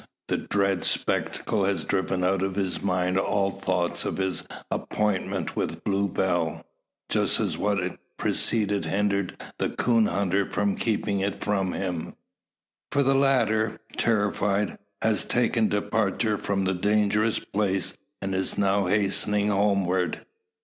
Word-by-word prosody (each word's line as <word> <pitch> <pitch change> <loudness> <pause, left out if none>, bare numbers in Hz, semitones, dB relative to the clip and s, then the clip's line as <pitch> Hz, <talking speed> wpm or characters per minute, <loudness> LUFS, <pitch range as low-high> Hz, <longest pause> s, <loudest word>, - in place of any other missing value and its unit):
The - - +1
dread 100 -2 0
spectacle 105 -3 0
has 95 -5 0
driven 95 -1 0
out 95 +1 +2
of 95 -1 -1
his 95 -2 -1
mind 90 -1 +1
all 100 0 +1
thoughts 95 -3 -1
of - - -3
his 95 -1 -1 0.3
appointment 95 -4 -1
with - - -3
Blue 100 0 +1
Bell; 85 -4 -1 0.4
just - - +1
as - - 0
what 95 -3 -1 0.2
preceded 105 -3 +2
hindered 100 -2 0 0.2
the - - +1
coon 115 -3 +2
hunter 95 +1 0
from 100 -1 0
keeping 105 -3 0
it 100 +1 -2
with 95 -3 0
him. 90 -4 -3 0.8
For 140 0 +3
the 135 +1 +3
latter, 115 -5 +2 0.2
terrified, 105 -2 +1 0.2
has 110 -1 +2
taken 115 -2 +2
departure 105 +1 0
from 95 -1 -1
the 95 - +1
dangerous 105 +3 +2
place, 95 -3 -1 0.3
and 95 0 -2
is 95 0 0
now 100 -1 +2
hastening 105 +1 +2
homeward. 100 -3 +1
100 Hz, 135 wpm, -26 LUFS, 95-105 Hz, 0.8 s, For